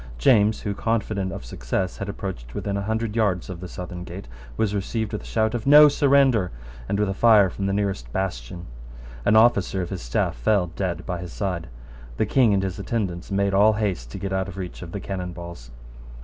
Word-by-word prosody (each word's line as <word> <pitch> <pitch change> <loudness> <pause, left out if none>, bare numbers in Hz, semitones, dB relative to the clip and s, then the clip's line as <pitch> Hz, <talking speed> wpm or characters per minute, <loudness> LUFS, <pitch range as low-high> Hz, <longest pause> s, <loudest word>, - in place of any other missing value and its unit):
James, 105 - +4
who, 100 - -2
confident 105 -3 -1
of 85 - -7
success, 60 +10 -3
had 100 - -5
approached 75 -12 -6
within 100 -1 -2
a 100 - -1
hundred 110 +1 -2
yards 100 -5 0
of 90 - -7
the 90 - -7
southern 90 0 -7
gate, 90 +2 -9 0.3
was 110 -2 +1
received 105 +2 -2
with 105 - -3
a - - -13
shout 110 0 +1
of 120 +1 -3
"No 150 +1 +9
surrender," 135 -8 +3 0.4
and 100 - 0
with 105 - +2
a 95 - -1
fire 105 -3 +5
from 100 +2 -3
the - - 0
nearest 100 -12 -2
bastion. 85 -3 -4 0.6
An 105 - +4
officer 110 -4 +4
of 90 - -7
his 95 - -4
staff - - -1
fell 90 - +1
dead 90 -3 -3
by 90 -2 -3
his 90 0 -7
side. 90 -5 -3 0.5
The - - +2
King 125 -5 +3
and 95 -1 +2
his 95 -1 -3
attendants 95 -5 -3
made 100 0 +1
all 105 +3 +5
haste 100 - -2
to - - -7
get 95 -1 -4
out 95 0 0
of 95 -1 -9
reach 90 -2 -6
of 85 -2 -8
the 100 - -4
cannon 90 -2 -5
balls. 85 -8 -9
95 Hz, 215 wpm, -24 LUFS, 90-105 Hz, 0.6 s, No